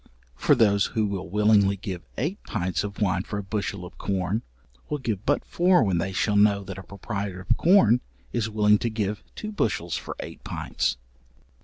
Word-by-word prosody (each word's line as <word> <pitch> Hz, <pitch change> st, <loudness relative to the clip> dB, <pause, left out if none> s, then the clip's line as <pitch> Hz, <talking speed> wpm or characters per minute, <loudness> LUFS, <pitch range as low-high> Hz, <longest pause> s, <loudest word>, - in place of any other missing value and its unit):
For -, -, +4 dB
those 100 Hz, -3 st, +4 dB
who 110 Hz, -, +3 dB
will 95 Hz, -3 st, -4 dB
willingly 105 Hz, 0 st, +4 dB
give 95 Hz, -2 st, -5 dB, 0.2 s
eight 165 Hz, -, -2 dB
pints 95 Hz, -2 st, -1 dB
of 100 Hz, 0 st, -6 dB
wine 100 Hz, -4 st, +1 dB
for 100 Hz, -, -5 dB
a 100 Hz, -, -3 dB
bushel 100 Hz, -2 st, -3 dB
of 90 Hz, -, -13 dB
corn, 95 Hz, +2 st, -1 dB, 0.5 s
will 150 Hz, -, -1 dB
give 110 Hz, -7 st, -3 dB
but 145 Hz, -, +2 dB
four 180 Hz, -4 st, +4 dB
when 95 Hz, -5 st, +1 dB
they 95 Hz, +3 st, -1 dB
shall 105 Hz, +2 st, +1 dB
know 100 Hz, -1 st, +4 dB
that 95 Hz, -, -7 dB
a -, -, -8 dB
proprietor 100 Hz, 0 st, -5 dB
of 120 Hz, -, +4 dB
corn 125 Hz, -, +5 dB, 0.3 s
is 110 Hz, -2 st, 0 dB
willing 105 Hz, -1 st, +4 dB
to 120 Hz, -, -1 dB
give 105 Hz, -2 st, -2 dB
two 215 Hz, -, -5 dB
bushels 85 Hz, -, -1 dB
for -, -, -6 dB
eight -, -, -8 dB
pints. -, -, -2 dB
105 Hz, 190 wpm, -26 LUFS, 95-110 Hz, 0.5 s, corn